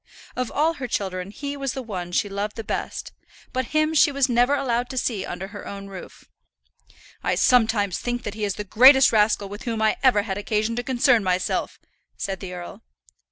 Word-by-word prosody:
Of 255 -1 -2
all 315 +3 +2
her 270 -6 -5
children 185 -4 -3
he 280 +7 -5
was 275 -2 -3
the 265 - -5
one 185 -6 -5
she 190 - +1
loved 200 +1 -4
the 225 - -5
best; - - -4 0.4
but 255 0 -1
him 310 +4 +1
she 310 -1 +5
was 280 -2 +2
never 245 +3 +3
allowed 245 -3 -1
to 260 - -6
see 220 -6 -1
under 190 +2 -6
her 205 -1 -9
own 200 0 -7
roof. 190 -2 -11 1.0
"I - - +1
sometimes 220 -6 +3
think 245 0 -3
that 210 - -4
he 215 0 -5
is 200 -2 -1
the 210 - -4
greatest 260 +6 +7
rascal 210 -2 +2
with 205 +4 -9
whom 230 -2 -2
I 220 0 +2
ever 245 -6 +4
had 200 -1 -4
occasion 215 +2 -1
to 245 - -1
concern 245 -2 +3
myself," 185 -1 -1 0.4
said 195 -1 -3
the 190 -2 -7
earl. 180 +4 -8
220 Hz, 205 wpm, -23 LUFS, 200-255 Hz, 1.0 s, greatest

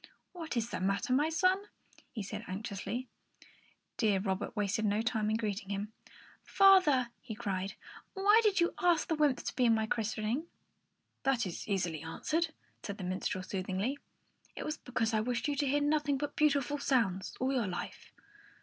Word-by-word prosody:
"What 325 -8 -5
is 235 +1 -1
the - - -2
matter, 195 +8 0
my 295 +4 +3
son?" 370 +4 +2 0.5
he 225 - -5
asked 200 +2 -7 0.2
anxiously. 205 +5 -4 0.9
Deaf 210 -4 +2
Robert 190 0 -2
wasted 205 +1 0
no 210 +1 +1
time 220 -3 0
in 215 - +2
greeting 210 -3 -3
him. 205 +2 -3 0.5
"Father," 370 -11 +5
he 230 -4 -7
cried, 195 -4 -3 0.4
"why 405 +3 +6
did 415 -4 +3
you 345 0 +2
ask 350 -3 +3
the - - +1
wymps 295 -4 +2
to 250 -2 +3
my 220 -1 +3
christening?" 225 +6 -1 0.7
"That 265 -4 +1
is 180 - -6
easily 175 -6 -1
answered," 310 - -1 0.3
said 200 -2 -5
the 190 - -6
minstrel, 185 0 -2
soothingly. 190 +8 -2 0.6
"It - - -5
was 305 +1 -2
because 235 -4 -1
I 215 - +3
wished 230 +2 -1
you 290 - 0
to 285 0 +1
hear 290 +2 +2
nothing 295 -1 +2
but 290 +1 -4
beautiful 290 -1 +2
sounds 200 -10 0
all 260 +2 +1
your 240 -6 +1
life." 180 -1 -6
235 Hz, 170 wpm, -32 LUFS, 200-290 Hz, 0.9 s, why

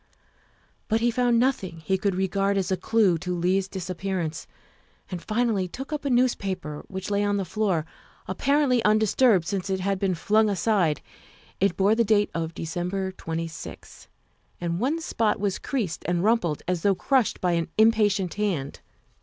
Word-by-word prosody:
But 225 0 +1
he 240 +1 +3
found 245 0 +2
nothing 195 -10 0
he 190 +4 0
could 190 0 0
regard 195 +1 0
as 190 -1 -1
a - - +3
clue 190 -2 +2
to 180 +2 -3
Leigh's 185 +2 +1
disappearance, 185 -4 -4 0.6
and 180 -2 -4
finally 215 -3 0
took 270 - -7
up 295 -1 -4
a - - +1
newspaper 195 - 0
which 190 +1 -5
lay 200 0 +2
on 205 0 +1
the 195 - -1
floor, 185 -4 0 0.4
apparently 275 -4 +2
undisturbed 215 -2 +4
since 195 +1 -3
it 190 0 0
had 195 0 -1
been 190 -2 +1
flung 215 +5 +2
aside. 195 -6 +1 0.6
It 195 -2 +1
bore 200 +2 +4
the 230 +1 +3
date 210 -1 +2
of 165 0 -3
December 180 +3 -3
26th, 165 -2 -7 0.5
and 170 0 -2
one 280 +8 0
spot 225 -9 0
was 200 -2 -1
creased 225 - -3
and 175 0 0
rumpled 200 -9 +1
as 180 -2 0
though 200 +1 +3
crushed 260 +1 +1
by 180 - +1
an 170 -1 0
impatient 210 -4 +3
hand. 190 -10 -2
195 Hz, 165 wpm, -25 LUFS, 180-220 Hz, 0.6 s, undisturbed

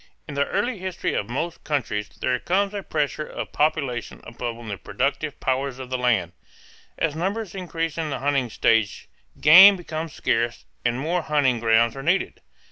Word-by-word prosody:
In 150 - -7
the 140 0 0
early 215 +2 -1
history 185 -1 -3
of 100 - -2
most 165 +7 -4
countries 120 -8 -2
there 125 -1 -2
comes 195 +6 0
a 200 - -3
pressure 155 -3 -2
of - - -6
population 140 -6 -1
upon 115 0 -6
the 100 - -3
productive 140 +3 -2
powers 130 0 -1
of 130 -1 -9
the 130 - 0
land. 110 -9 +1 0.7
As 155 -2 0
numbers 195 +4 -2
increase 165 -4 -3
in 160 -2 -2
the 140 - -2
hunting 135 -2 0
stage 110 -1 +1 0.3
game 190 +7 +9
becomes 165 -3 -5
scarce 115 +1 -1 0.2
and 120 +1 0
more 170 +5 0
hunting 145 -6 +1
grounds 115 +1 +3
are 135 - -6
needed. 175 +7 0
145 Hz, 170 wpm, -24 LUFS, 120-165 Hz, 0.7 s, game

